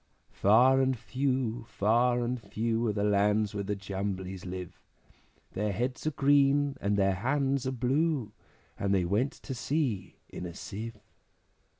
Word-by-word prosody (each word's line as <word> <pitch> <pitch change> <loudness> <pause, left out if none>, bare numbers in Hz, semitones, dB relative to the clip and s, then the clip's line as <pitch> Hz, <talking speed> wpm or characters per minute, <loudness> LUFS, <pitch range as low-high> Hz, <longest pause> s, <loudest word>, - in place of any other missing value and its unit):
Far 125 +6 +5
and 130 -1 +1
few, 130 -2 -1
far 120 +4 +2
and 120 0 -2
few, 115 +2 -1
Are - - +2
the 100 0 -1
lands 105 0 +2
where 100 -1 -2
the 105 +1 -2
Jumblies 95 -1 -4
live; 90 -1 -7 0.7
Their 105 +1 -1
heads 125 +8 -2
are - - +2
green, 140 0 +3
and 100 +1 +1
their 95 -1 +3
hands 135 +5 0
are - - 0
blue, 130 -1 0 0.5
And 100 0 +1
they 90 -2 +2
went 105 +10 +1
to - - -8
sea 125 -6 -2
in 90 - -6
a 85 - -9
Sieve. 110 +2 -6
115 Hz, 155 wpm, -29 LUFS, 100-130 Hz, 0.7 s, Far